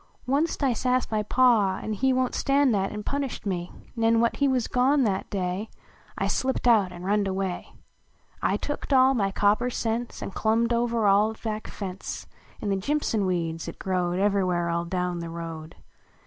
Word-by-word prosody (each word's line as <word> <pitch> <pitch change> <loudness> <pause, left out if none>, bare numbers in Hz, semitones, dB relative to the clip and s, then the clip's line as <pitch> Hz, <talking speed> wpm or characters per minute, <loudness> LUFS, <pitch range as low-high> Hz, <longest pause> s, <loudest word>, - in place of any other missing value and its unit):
WUNST 285 +6 0
T - - +2
sasscd 255 0 +1
my 215 -1 +1
Pa, 210 -4 +3
an 215 - -4
he 265 +5 +1
"Won 255 -1 +1
t - - -6
staiul 275 -1 +3
that, 195 -2 0
an 210 0 -5
punished 280 -2 -3
me, 180 -3 -3 0.2
Nen 230 0 +3
when 235 0 +3
he 280 - +1
\vas 255 -3 +1
gone 265 +3 +3
that 195 -4 -1
day, 190 +1 -2 0.5
I - - 0
slipped 260 -1 0
out 210 -6 +4
an 175 0 -9
runned 200 +1 +1
away. 190 -1 -3 0.7
I - - +1
tooked 290 -1 -3
all 260 0 +6
my 200 -6 +1
copper 205 +5 +2
cents. 235 0 -3
An - - -5
clumhed 230 +3 +1
over 235 -1 +1
our 205 +3 +4
back 215 -1 -3
tence 190 -1 -6 0.3
In 205 - -3
the 195 - +1
jimpson 220 -3 0
wecds 165 -2 -2
at - - -10
Crowed 180 -2 -1
Ever 200 0 +2
where 175 -2 0
all 170 0 -1
down 180 0 -2
the 170 0 -5
road. 165 -1 -7
210 Hz, 190 wpm, -26 LUFS, 185-245 Hz, 0.7 s, all